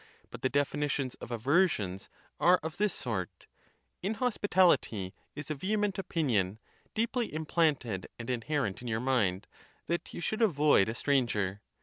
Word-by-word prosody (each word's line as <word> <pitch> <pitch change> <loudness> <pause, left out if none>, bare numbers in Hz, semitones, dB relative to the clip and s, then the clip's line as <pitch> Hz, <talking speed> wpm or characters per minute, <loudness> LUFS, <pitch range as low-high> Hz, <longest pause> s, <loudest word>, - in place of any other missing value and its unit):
But - - -9
the 130 - +1
definitions 140 -1 0
of 120 - -8
aver 140 - +4
sions 95 - -4 0.3
are 180 +1 +5
of 160 0 -5
this 210 0 +2
sort: 95 - -4 0.6
inhospitality 190 - +2 0.2
is 145 +1 -6
a - - +2
vehement 200 +5 -1
opinion, 120 - 0 0.4
deeply 230 +1 0
implanted 150 - 0
and 115 - -7
inherent 125 -3 -1
in 125 - -7
your 110 -1 0
mind, 110 -7 +1 0.4
that 170 0 -2
you - - -6
should 215 +6 -2
avoid 150 - +4
a 115 - -3
stranger. 110 -8 0
140 Hz, 140 wpm, -31 LUFS, 110-175 Hz, 0.6 s, are